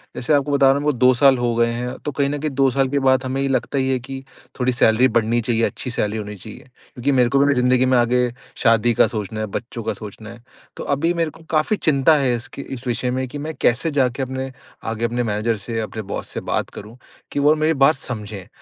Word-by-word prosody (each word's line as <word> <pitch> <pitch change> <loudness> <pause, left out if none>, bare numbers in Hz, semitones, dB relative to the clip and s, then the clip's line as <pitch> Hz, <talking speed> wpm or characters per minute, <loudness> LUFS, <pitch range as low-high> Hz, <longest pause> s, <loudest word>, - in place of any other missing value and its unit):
जैसे 140 +5 0
आपको 145 0 +2
बता 140 -1 +4
रहा 135 - +6
हूँ 140 - -1
मेरे 150 0 +2
को 125 - -7
2 130 +2 +5
साल 135 +1 +5
हो 120 -1 0
गए 115 0 +2
हैं 125 +1 -4
तो 150 - -1
कहीं 140 0 0
न 145 - -2
कहीं 155 -1 -2
2 135 0 +2
साल 135 +1 +1
के 140 0 0
बाद 130 0 +3
हमें 135 +1 -1
लगता 135 +1 -1
ही 130 0 +1
है 130 -1 +1
कि 135 +2 -8 0.4
थोड़ी 125 0 +2
सैलरी 120 +1 +4
बढ़नी 115 0 +1
चाहिए, 115 0 0
अच्छी 125 - -2
सैलरी 105 -1 -1
होनी 105 -1 -6
चाहिए। 105 +3 -11 0.3
क्योंकि 135 +1 -1
मेरे 125 -3 +3
को 140 - +2
भी 140 0 +4
जिंदगी 125 0 +3
में 130 0 +3
आगे 120 0 +2 0.3
शादी 115 0 +3
का - - +4
सोचना 110 -1 -5
है, 110 - -1
बच्चों 115 +2 -6
का 110 0 -1
सोचना 110 +2 -10
है। 115 0 -13 0.3
तो - - -5
अभी 165 +5 +1
मेरे 165 -2 0
को 165 +2 -16
काफ़ी 155 +7 +2
चिंता 150 0 +3
है 130 -3 +1
इसके 120 +3 -7
इस 130 0 -7
विषय 125 +1 -1
में 130 +1 -2
कि 145 - -8
मैं 155 +2 -5
कैसे 130 +7 +2
जाके 130 -2 0
अपने 130 0 -4 0.4
आगे 115 +1 -2
अपने 120 +1 -1
मैनेजर 110 +1 -1
से 115 +3 -4
अपने 110 0 -5
बॉस - - -5
से - - -5
बात - - -1
करूँ 110 +4 -10 0.3
कि - - -2
वो 150 +2 +4
मेरी 160 +1 +3
बात 155 - +4
समझें। 105 -7 -7
125 Hz, 250 wpm, -21 LUFS, 115-140 Hz, 0.4 s, रहा